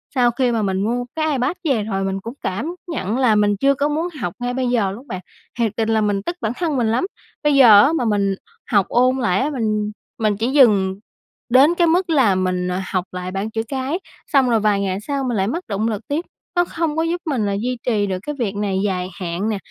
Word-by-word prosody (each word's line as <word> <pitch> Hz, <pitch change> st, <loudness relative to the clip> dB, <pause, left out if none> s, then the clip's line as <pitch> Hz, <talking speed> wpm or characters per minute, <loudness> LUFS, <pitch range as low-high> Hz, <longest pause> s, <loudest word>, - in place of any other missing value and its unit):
sau 245 Hz, -1 st, +4 dB
khi 250 Hz, +1 st, +1 dB
mà 230 Hz, -2 st, 0 dB
mình 190 Hz, -2 st, 0 dB
mua 245 Hz, +3 st, -1 dB
cái 315 Hz, -1 st, 0 dB
Ipad 265 Hz, +6 st, 0 dB
về 265 Hz, -10 st, +1 dB
rồi 195 Hz, -2 st, -2 dB
mình 195 Hz, 0 st, -2 dB
cũng 230 Hz, -, -7 dB
cảm 295 Hz, -, -3 dB
nhận 240 Hz, -, -2 dB
là 250 Hz, -5 st, +3 dB
mình 205 Hz, -1 st, +3 dB
chưa 275 Hz, 0 st, +4 dB
có 285 Hz, +2 st, 0 dB
muốn 315 Hz, +3 st, -1 dB
học 175 Hz, -, -2 dB
ngay 245 Hz, 0 st, -2 dB
bây 260 Hz, -1 st, -1 dB
giờ 225 Hz, -6 st, +1 dB
luôn 240 Hz, +8 st, -10 dB
bạn, 185 Hz, -5 st, -5 dB, 0.4 s
thiệt 225 Hz, -3 st, +2 dB
tình 225 Hz, -1 st, 0 dB
là 220 Hz, -1 st, +2 dB
mình 205 Hz, -2 st, 0 dB
tức 345 Hz, -, -3 dB
bản 220 Hz, -2 st, 0 dB
thân 325 Hz, -5 st, -1 dB
mình 235 Hz, -3 st, +1 dB
lắm. 240 Hz, +9 st, +1 dB, 0.4 s
Bây 295 Hz, -1 st, +3 dB
giờ 225 Hz, -7 st, +9 dB
á 310 Hz, -, +3 dB
mà 255 Hz, -, 0 dB
mình 200 Hz, -3 st, +1 dB, 0.4 s
học 200 Hz, -3 st, +4 dB
ôn 255 Hz, +2 st, +3 dB
lại 185 Hz, -8 st, +1 dB
á 280 Hz, -, 0 dB
mình 215 Hz, -6 st, -1 dB, 0.3 s
mình 215 Hz, -2 st, +1 dB
chỉ 230 Hz, +4 st, -1 dB
dừng 205 Hz, -9 st, +4 dB, 0.5 s
đến 275 Hz, +7 st, +5 dB
cái 345 Hz, -1 st, +3 dB
mức 355 Hz, +2 st, +2 dB
là 260 Hz, -11 st, +4 dB
mình 185 Hz, -1 st, 0 dB, 0.2 s
học 185 Hz, -2 st, 0 dB
lại 180 Hz, 0 st, -5 dB
bảng 195 Hz, +3 st, -3 dB
chữ 225 Hz, -, -1 dB
cái, 270 Hz, +6 st, -2 dB, 0.3 s
xong 270 Hz, -4 st, +3 dB
rồi 230 Hz, -2 st, +3 dB
vài 205 Hz, -1 st, +2 dB
ngày 190 Hz, -1 st, -1 dB
sau 280 Hz, -1 st, -1 dB
mình 245 Hz, -4 st, -1 dB
lại 190 Hz, -, +1 dB
mất 335 Hz, -, -3 dB
động 215 Hz, +2 st, -1 dB
lực 220 Hz, 0 st, -4 dB
tiếp, 310 Hz, +5 st, -2 dB, 0.3 s
nó 350 Hz, 0 st, +3 dB
không 325 Hz, -3 st, -2 dB
có 320 Hz, -, +2 dB
giúp 340 Hz, +1 st, -1 dB
mình 265 Hz, -9 st, 0 dB
là 200 Hz, -, 0 dB
duy 245 Hz, +5 st, -2 dB
trì 215 Hz, -4 st, +1 dB
được 185 Hz, -1 st, -2 dB
cái 295 Hz, -, -3 dB
việc 210 Hz, -4 st, -1 dB
này 200 Hz, -2 st, -1 dB
dài 185 Hz, -2 st, -1 dB
hạn 180 Hz, +3 st, -2 dB
nè, 215 Hz, -, -1 dB
230 Hz, 250 wpm, -20 LUFS, 200-275 Hz, 0.5 s, giờ